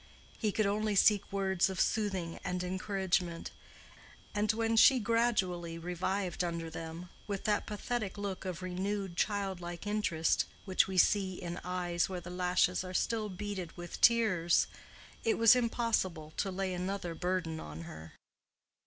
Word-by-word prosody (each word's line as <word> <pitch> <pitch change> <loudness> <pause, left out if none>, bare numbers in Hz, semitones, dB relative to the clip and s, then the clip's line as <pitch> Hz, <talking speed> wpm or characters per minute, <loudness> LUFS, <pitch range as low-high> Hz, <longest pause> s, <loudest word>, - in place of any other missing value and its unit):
He 215 -3 +1
could 215 +1 +1
only 210 +1 0
seek 200 +1 +4
words 190 -1 +1
of 190 -1 -4
soothing 190 -6 0
and 180 0 -2
encouragement: 185 -2 -1 0.8
and 210 0 +2
when 225 +1 0
she 260 +4 +7
gradually 195 -7 +1
revived 180 +2 -2
under 170 -1 -3
them, 165 +2 -7 0.2
with 200 -2 -3
that 210 -1 +1
pathetic 210 -1 -3
look 200 -2 -4
of 185 -1 -5
renewed 190 0 -2
childlike 190 -3 -2
interest 205 -6 +1 0.2
which 190 -2 +3
we 190 -1 -4
see 190 0 +3
in 175 -1 -5
eyes 180 -1 -1
where 185 -1 -3
the 175 0 -9
lashes 180 0 +2
are 185 0 -7
still 220 0 0
beaded 185 -2 -5
with 175 0 -7
tears, 200 -8 +4 0.6
it 225 - +2
was 230 +1 +7
impossible 225 -10 0
to 195 - 0
lay 190 0 -2
another 180 -1 -3
burden 175 -1 -2
on 75 +1 -8
her. 80 -1 -10
185 Hz, 145 wpm, -32 LUFS, 175-205 Hz, 0.8 s, she